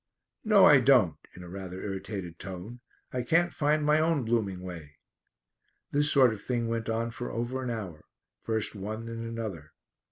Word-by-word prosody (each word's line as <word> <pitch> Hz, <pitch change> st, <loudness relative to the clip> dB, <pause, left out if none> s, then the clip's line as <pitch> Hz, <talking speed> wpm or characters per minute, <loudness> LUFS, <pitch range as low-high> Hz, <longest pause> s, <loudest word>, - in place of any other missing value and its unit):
"No, 215 Hz, -3 st, +6 dB
I 145 Hz, -2 st, +8 dB
don't," 125 Hz, -, +4 dB, 0.2 s
in 90 Hz, -, -10 dB
a -, -, -10 dB
rather 95 Hz, 0 st, -7 dB
irritated 95 Hz, -3 st, -5 dB
tone. 95 Hz, +6 st, -8 dB, 0.3 s
"I 125 Hz, -, -1 dB
can't 170 Hz, +7 st, +2 dB
find 150 Hz, 0 st, +1 dB
my 150 Hz, +1 st, +4 dB
own 160 Hz, -5 st, +1 dB
blooming 105 Hz, -5 st, 0 dB
way." 85 Hz, -5 st, -9 dB, 1.0 s
This 145 Hz, +1 st, +3 dB
sort 130 Hz, -5 st, +5 dB
of 105 Hz, -, -9 dB
thing 120 Hz, -1 st, -1 dB
went 115 Hz, 0 st, -2 dB
on 115 Hz, +1 st, -1 dB
for 120 Hz, +1 st, -5 dB
over 120 Hz, +3 st, -3 dB
an 125 Hz, -, -3 dB
hour; 95 Hz, -10 st, -6 dB, 0.4 s
first 110 Hz, -2 st, -1 dB
one 110 Hz, +2 st, -5 dB
then 115 Hz, 0 st, -6 dB
another. 115 Hz, -9 st, -6 dB
115 Hz, 170 wpm, -29 LUFS, 95-130 Hz, 1.0 s, I